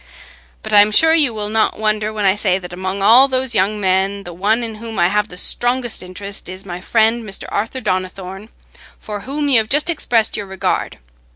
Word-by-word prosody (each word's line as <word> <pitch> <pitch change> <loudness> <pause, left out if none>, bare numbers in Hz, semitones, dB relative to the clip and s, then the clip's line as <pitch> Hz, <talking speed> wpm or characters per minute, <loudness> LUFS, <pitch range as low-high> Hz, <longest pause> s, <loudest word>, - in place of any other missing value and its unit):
But - - -4
I'm 205 0 +6
sure 320 +9 +5
you 300 -6 +4
will 210 -2 -4
not 220 0 0
wonder 215 0 -1
when 210 -2 -3
I 190 - +4
say 195 -2 +1
that 180 -2 -9
among 185 +2 -4
all 240 +6 +7
those 260 -2 0
young 210 +1 +1
men, 195 +1 0
the 175 - -9
one 210 +7 0
in 225 -1 -5
whom 225 -2 -7
I 175 0 +3
have 210 +1 0
the 180 - -12
strongest 245 +4 0
interest 195 +1 -8
is 185 +1 -8
my 180 -1 -7
friend 225 +3 +1
Mr. 195 -3 -5
Arthur 225 +5 -3
Donnithorne, 185 +1 -4 0.5
for 210 -1 -7
whom 285 +6 -3
you 260 -5 +5
have 220 0 -3
just 300 +4 +2
expressed 235 -8 +1
your 205 - -5
regard. 190 -1 -2
210 Hz, 205 wpm, -18 LUFS, 190-230 Hz, 0.5 s, all